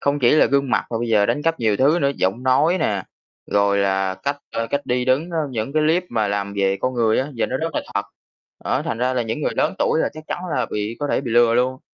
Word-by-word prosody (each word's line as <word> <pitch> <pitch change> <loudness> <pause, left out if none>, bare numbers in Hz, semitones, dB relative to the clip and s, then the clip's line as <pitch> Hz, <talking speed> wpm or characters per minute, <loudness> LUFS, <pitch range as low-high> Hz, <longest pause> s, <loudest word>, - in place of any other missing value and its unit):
Không 140 +1 0
chỉ 120 -4 +4
là 155 - +5
gương 140 -1 +1
mặt 125 - +1
mà 115 - -2
bây 120 0 -2
giờ 105 -2 +3
đánh 125 +7 -1
cắp 165 -3 0
nhiều 110 -3 +2
thứ 145 +8 +3
nữa, 140 - +2
giọng 95 +7 -1
nói 150 +8 +3
nè, 100 -3 0 0.4
rồi 100 0 +2
là 95 -1 +1
cách, 140 +10 -3
a, 115 - -2
cách 140 +4 -3
đi 125 0 0
đứng 130 +7 +1
nó 170 - -5
những 115 +1 -3
cái 155 0 +2
clip 165 +4 +2
mà 110 -3 0
làm 100 0 -2
về 95 0 +1
con 130 0 -1
người 115 -2 +2
á, 135 +3 -1
giờ 115 - 0
nó 130 - -2
rất 160 +1 -3
là - - -1
thật. - - +1 0.6
Đó, - - 0
thành 115 - -3
ra 125 +1 0
là 125 - +1
những 115 +5 -4
người - - 0
lớn - - +1
tuổi - - +2
là - - +1
chắc 155 +1 -10
chắn - - -3 0.2
là 125 - 0
bị 105 +2 -3
có 145 - -1
thể - - +1
bị 130 -3 -5
lừa 120 0 +4
luôn. 130 +2 +1
125 Hz, 280 wpm, -21 LUFS, 110-140 Hz, 0.6 s, là